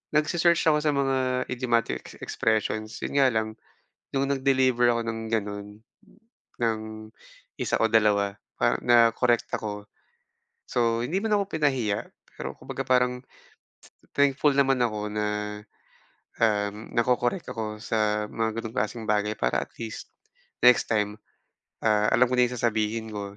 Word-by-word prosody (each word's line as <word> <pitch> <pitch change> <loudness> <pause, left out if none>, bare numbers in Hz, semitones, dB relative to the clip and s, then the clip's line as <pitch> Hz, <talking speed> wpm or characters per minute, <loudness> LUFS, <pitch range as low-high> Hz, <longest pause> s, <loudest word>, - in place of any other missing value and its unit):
nagse-search 170 +3 +3
ako 150 - +3
sa 150 -1 +1
mga 130 -2 +1
idiomatic 120 - 0
ex - - -10
expressions 110 0 -1
'yon - - -4
nga 135 - +6
lang, 110 0 0 0.7
no'ng 135 0 +1
nag-deliver 130 -2 +3
ako 115 - 0
ng 115 0 -3
gano'n 100 -2 -2 1.0
ng 115 -2 +1 0.8
1 - - -1
o 115 - +4
2 105 -2 +3 0.3
parang - - +2
nakorek 120 0 +4
ako. 105 -1 -5 0.8
So 115 -2 +1
hindi 170 +10 -1
man 220 -1 +1
ako 200 -1 -2
pinahiya 130 -9 0 0.3
pero - - -5
kumbaga 135 - -5
parang 125 0 +2 0.9
thankful 140 +1 +3
naman 135 -2 +3
ako 105 -2 -2
na, 105 0 -1 1.2
um, 105 -1 0
nako-korek 120 +7 +1
ako 105 -1 -5
sa 105 -2 0
mga 115 0 -2
ganong 110 -1 -7
klaseng 110 +2 -2
bagay 105 0 +1
para - - 0
at - - -28
least, 115 -2 -6 0.6
next 125 -1 +6
time, 105 -1 0 0.7
ah, 105 0 +3
alam 130 - +5
ko 125 - -1
na 125 0 +5
'yong 125 - -5
sasabihin 110 -1 0
ko, 100 -1 -6
115 Hz, 140 wpm, -26 LUFS, 105-130 Hz, 1.2 s, nga